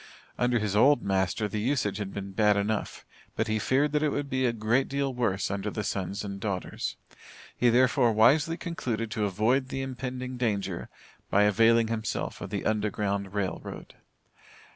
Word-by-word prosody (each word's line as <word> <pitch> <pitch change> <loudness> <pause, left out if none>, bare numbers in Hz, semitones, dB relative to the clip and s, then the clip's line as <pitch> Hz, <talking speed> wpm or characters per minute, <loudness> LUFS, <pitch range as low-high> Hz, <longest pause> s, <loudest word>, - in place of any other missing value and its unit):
Under 125 0 +1
his 105 -2 -1
old 130 +4 +5
master, 95 +2 0
the 105 +1 -3
usage 125 -4 0
had 100 -2 -4
been 100 -1 -6
bad 105 0 +3
enough, 105 +1 -2 0.3
but 110 - 0
he 110 0 0
feared 140 +6 +2
that 150 0 +1
it 155 - +2
would 145 0 -3
be 130 0 +2
a - - +2
great 115 +4 +1
deal 140 -1 -1
worse 110 -7 0
under 100 +1 -2
the 105 +1 -4
sons 100 +1 -3
and 100 -1 -5
daughters. 95 -3 -3 0.6
He 125 - +3
therefore 125 0 +4
wisely 140 +9 +4
concluded 115 -10 -3
to 105 -2 0
avoid 115 +7 +1
the 135 0 -3
impending 130 -1 -5
danger 105 -5 -2 0.4
by 100 - +4
availing 115 +2 +4
himself 110 -2 -3
of - - -5
the - - -3
Underground 105 -2 -1
Rail 95 -3 -1
Road. - - -9
110 Hz, 175 wpm, -28 LUFS, 100-130 Hz, 0.6 s, old